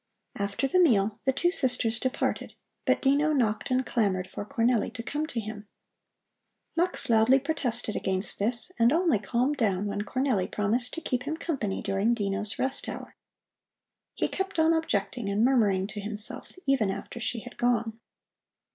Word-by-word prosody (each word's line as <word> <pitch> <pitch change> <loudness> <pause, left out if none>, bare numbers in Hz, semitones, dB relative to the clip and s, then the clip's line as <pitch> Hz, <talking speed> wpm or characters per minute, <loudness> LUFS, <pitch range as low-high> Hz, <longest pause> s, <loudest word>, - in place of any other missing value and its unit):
After 200 +6 -1
the 365 - +2
meal 220 - +3
the 265 - +4
two 340 +7 +1
sisters 250 - +1
departed, 260 +1 -2 0.3
but - - +2
Dino 290 +3 +3
knocked 225 -5 0
and 255 0 +1
clamored 195 -6 0
for 190 - -6
Cornelli 230 +2 +1
to 230 - -5
come 300 +5 -3
to 250 - -3
him. 215 -1 -7 1.1
Mux 350 +2 +2
loudly 230 +3 +5
protested 255 -7 -2
against 190 +1 +1
this 235 - +2
and 230 +1 +5
only 325 - +2
calmed 245 +8 0
down 200 -5 +1
when 205 0 -2
Cornelli 250 -4 -1
promised 225 +4 -1
to 330 - -5
keep 250 -5 -1
him 315 +1 -2
company 270 - -3
during 200 +4 +1
Dino's 205 -1 -3
rest 265 +1 +1
hour. - - -8 1.0
He - - 0
kept 385 -1 -4
on 320 +1 +4
objecting 240 -8 -1
and 205 +3 +2
murmuring 210 -8 +3
to 210 - -6
himself 210 +1 -4
even 265 -7 +2
after 195 +5 -6
she 235 0 -3
had 245 - -11
gone. 235 -2 0
235 Hz, 165 wpm, -27 LUFS, 210-270 Hz, 1.1 s, loudly